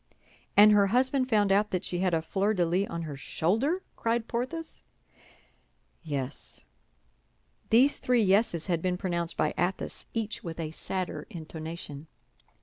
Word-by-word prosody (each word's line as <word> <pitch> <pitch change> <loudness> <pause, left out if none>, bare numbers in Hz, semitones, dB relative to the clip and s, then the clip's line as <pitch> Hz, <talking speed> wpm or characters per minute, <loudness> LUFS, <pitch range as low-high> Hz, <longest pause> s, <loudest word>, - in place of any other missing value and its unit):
"And 210 +1 +9
her 205 -1 +5
husband 255 +4 +2
found 205 -4 +3
out 205 +2 +3
that 185 - -2
she 175 - -2
had 185 0 +2
a 160 - -1
fleur 200 +5 0
de 175 -2 +2
lis 180 +4 +1
on 170 0 -4
her 150 -3 -5
shoulder?" 225 - 0
cried 230 0 -1
Porthos. 260 +7 -4 1.2
"Yes." 140 - -5 1.0
These 255 +6 +5
three 245 -3 +2
yeses 190 -4 +2
had 170 -3 0
been 180 0 0
pronounced 170 -2 -2
by 155 - +1
Athos, 180 +3 -2
each 220 -1 -3
with 165 -1 -6
a 155 -2 -3
sadder 175 -2 -4
intonation. 160 -2 -7
185 Hz, 145 wpm, -28 LUFS, 165-225 Hz, 1.2 s, And